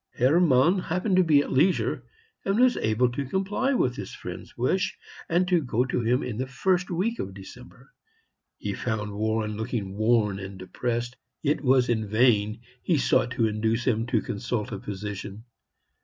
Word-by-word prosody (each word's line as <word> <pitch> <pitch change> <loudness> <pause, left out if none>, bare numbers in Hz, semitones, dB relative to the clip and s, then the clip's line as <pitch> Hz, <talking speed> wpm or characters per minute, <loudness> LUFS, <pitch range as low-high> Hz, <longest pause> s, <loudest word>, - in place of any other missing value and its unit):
Hermann 155 +5 +4
happened 185 +3 -1
to 185 - +6
be 150 -4 +4
at - - -7
leisure, 170 +8 +2 0.4
and 195 +3 0
was 250 0 +5
able 115 +3 +1
to 140 +3 -3
comply 200 - 0
with 125 - +1
his 100 - -7
friend's - - -9
wish, 185 +10 0 0.3
and 175 +2 +2
to 175 -2 +3
go 125 -2 0
to 125 -1 -1
him 120 +2 +1
in 115 -2 -4
the 130 - -2
first 180 +7 0
week 200 +7 -1
of 95 0 -5
December. 125 +6 -13 0.6
He - - -4
found 110 -3 -3
Warren 110 0 -1
looking 110 -4 -3
worn 110 -2 +2
and 95 0 -8
depressed. 120 +6 -3 0.3
It 150 0 +1
was 130 -2 +3
in 110 -3 0
vain 110 0 +2 0.2
he 170 - +1
sought 125 - +2
to 115 - +1
induce 110 +2 0
him 115 -2 +1
to 115 -3 +1
consult 105 +1 -3
a 100 - -4
physician. 105 +1 -6
120 Hz, 170 wpm, -26 LUFS, 110-160 Hz, 0.6 s, to